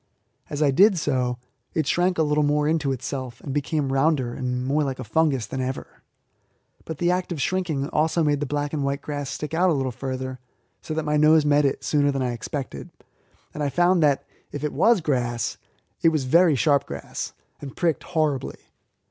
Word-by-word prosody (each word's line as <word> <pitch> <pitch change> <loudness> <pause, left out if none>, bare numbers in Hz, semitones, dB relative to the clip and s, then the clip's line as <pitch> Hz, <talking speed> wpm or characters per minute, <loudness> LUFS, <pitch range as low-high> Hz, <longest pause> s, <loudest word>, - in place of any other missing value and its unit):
As 150 +1 -1
I 140 - +4
did 195 +7 +5
so 130 -5 0 0.4
it 155 - +1
shrank 175 +4 +1
a 160 - +3
little 150 0 +2
more 150 0 +2
into 155 -3 +1
itself, 130 -1 -5
and 135 - -5
became 145 -1 -1
rounder 135 -3 +1
and 125 -1 -3
more 145 +3 +1
like 135 -2 -3
a 130 - -6
fungus 135 0 +1
than 130 - -4
ever; 130 +1 -5 0.8
but 160 - -5
the 175 +2 +2
act 180 0 -1
of 165 - -3
shrinking 160 -4 -1
also 160 +2 +1
made 145 -2 +2
the 145 - -2
black 145 +1 -2
and 145 -2 -1
white 140 0 -2
grass 145 -2 -4
stick 150 +1 -5
out 180 +3 +3
a - - +3
little 135 -3 -1
further, 130 0 -5 0.4
so 155 - -5
that 160 -1 -2
my 150 0 +1
nose 155 0 +5
met 145 0 +4
it 135 - -1
sooner 145 -1 +2
than 135 -1 -1
I 125 - 0
expected, 120 - -6 0.6
and 150 - -5
I 145 - +1
found 175 +3 +3
that, 145 -3 +2 0.3
if 145 - -6
it 150 - -2
was 230 -5 +4
grass, 120 -6 -1 0.4
it 165 - +6
was 155 -4 0
very 165 +4 +4
sharp 140 +1 +2
grass, 70 0 -6 0.3
and 140 -2 -9
pricked 165 -6 +1
horribly. 155 -6 -1
145 Hz, 200 wpm, -24 LUFS, 135-160 Hz, 0.8 s, it